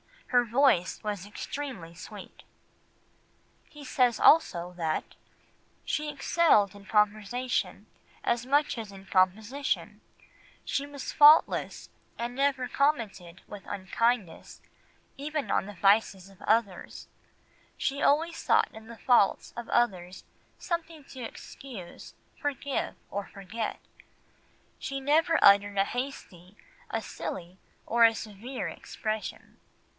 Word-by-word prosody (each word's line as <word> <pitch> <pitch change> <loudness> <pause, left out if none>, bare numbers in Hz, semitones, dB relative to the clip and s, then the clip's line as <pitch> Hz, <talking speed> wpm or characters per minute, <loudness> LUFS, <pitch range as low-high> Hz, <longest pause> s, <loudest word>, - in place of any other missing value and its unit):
Her 245 -1 +4
voice 240 -6 +2
was 205 -2 -4
extremely 210 - -6
sweet." 170 - -11 1.3
He 295 -1 -12
says 250 -3 +2
also 180 - +4
that 160 -2 -2 0.7
"she 300 0 -2
excelled 290 - +3
in 200 -1 -14
conversation 215 +4 0 0.4
as 240 0 0
much 290 +1 +2
as 215 -3 -7
in 195 0 -12
composition; 210 +9 0 0.6
she 280 0 -2
was 285 -2 -6
faultless, 300 +2 +5 0.3
and 235 +1 -4
never 270 -1 0
commented 215 - -1
with 205 -2 -10
unkindness 205 0 -2 0.6
even 300 +1 -3
on - - +1
the 205 - -8
vices 195 0 +2
of 195 - -20
others; 215 -4 -1 0.7
she 280 +1 -2
always 325 +4 +2
sought - - +2
in 220 0 -12
the 235 0 -10
faults 240 -6 +2
of 235 - -6
others 185 -6 0 0.3
something 330 -3 -4
to 265 -1 -11
excuse, 225 -4 -10 0.2
forgive, 280 -1 -2 0.2
or 200 0 -4
forget. 205 +3 -5 1.0
She 275 0 -4
never 320 +4 +3
uttered 200 0 +6
a 195 - +5
hasty, 210 -7 -6 0.3
a 225 - -2
silly, 185 -3 -7 0.3
or 235 0 +5
a 225 0 +4
severe 220 +5 -6
expression." 215 -1 -6
230 Hz, 115 wpm, -28 LUFS, 200-275 Hz, 1.3 s, uttered